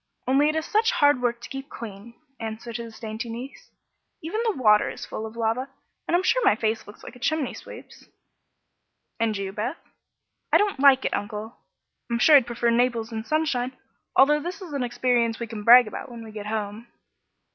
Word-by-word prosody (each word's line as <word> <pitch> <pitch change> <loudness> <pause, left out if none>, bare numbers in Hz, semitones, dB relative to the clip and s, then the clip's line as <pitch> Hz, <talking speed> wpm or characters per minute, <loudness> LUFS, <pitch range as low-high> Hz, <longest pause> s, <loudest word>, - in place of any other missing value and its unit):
"Only 275 +3 +4
it 310 - -1
is 315 0 -1
such 445 +5 +2
hard 290 - +4
work 240 -1 -1
to - - -9
keep 270 +1 -7
clean," 230 +1 -9 0.2
answered 225 +1 -5
his 230 -1 -9
dainty 225 +1 -5
niece. 245 +4 -8 0.5
"Even 365 +8 -2
the 445 - +2
water 210 -4 +4
is - - -7
full 220 - -5
of 220 - -12
lava, 230 +4 -1 0.4
and 345 - +3
I'm 365 - -1
sure - - +2
my 305 - +5
face 220 -1 -2
looks 205 - -13
like - - -10
a - - -14
chimney 310 0 -1
sweep's." - - -12 1.1
"And 225 -2 0
you, 195 -1 -4
Beth?" 215 +11 -3 0.7
"I - - +7
don't 410 -8 0
like 270 -1 +6
it, - - 0
Uncle. 210 +2 -5 0.5
I'm 235 - 0
sure 300 +5 +6
I'd 265 -4 +6
prefer 235 0 0
Naples 235 -1 +1
in 220 -1 -4
sunshine, 260 -5 -1 0.4
although 295 +3 +5
this 350 +6 -6
is 360 -6 -9
an 280 - -2
experience 240 -2 0
we 235 - -3
can 220 -2 -7
brag 245 +3 +9
about 215 - -7
when 235 -1 -9
we 220 - -10
get 210 -1 -7
home." 215 +1 -4
240 Hz, 200 wpm, -25 LUFS, 220-280 Hz, 1.1 s, brag